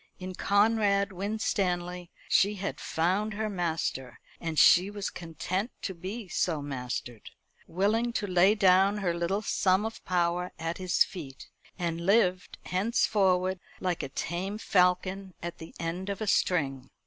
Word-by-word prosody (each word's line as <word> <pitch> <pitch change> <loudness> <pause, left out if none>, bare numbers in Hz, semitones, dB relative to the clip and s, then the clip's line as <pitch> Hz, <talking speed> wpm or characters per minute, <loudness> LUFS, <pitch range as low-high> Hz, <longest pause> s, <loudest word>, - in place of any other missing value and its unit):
In 185 0 -6
Conrad 200 0 +2
Winstanley 180 -3 -2 0.2
she 205 +2 +3
had 195 0 -4
found 195 +6 0
her 215 0 -2
master, 160 -8 -2 0.2
and 165 -2 -4
she 180 +6 +6
was 205 -1 -4
content 175 +6 -3
to 190 - -2
be 190 +5 -6
so 170 -3 0
mastered; 125 -5 -5 0.4
willing 215 +7 +1
to 210 - -1
lay 190 +2 +4
down 195 0 +4
her 185 -4 0
little 170 +5 -1
sum 190 0 +2
of 225 - -6
power 175 0 0
at 165 +2 -4
his 185 -1 +3
feet, 140 -8 -9 0.3
and 170 -2 -2
live 185 -3 +3 0.2
henceforward 190 -2 +1 0.2
like 180 -2 -1
a - - -5
tame 180 +8 -3
falcon 185 -1 +1
at 170 0 -5
the 160 - -9
end 175 +3 -3
of 200 - -3
a 215 - -2
string. 135 -10 0
185 Hz, 145 wpm, -29 LUFS, 170-200 Hz, 0.4 s, she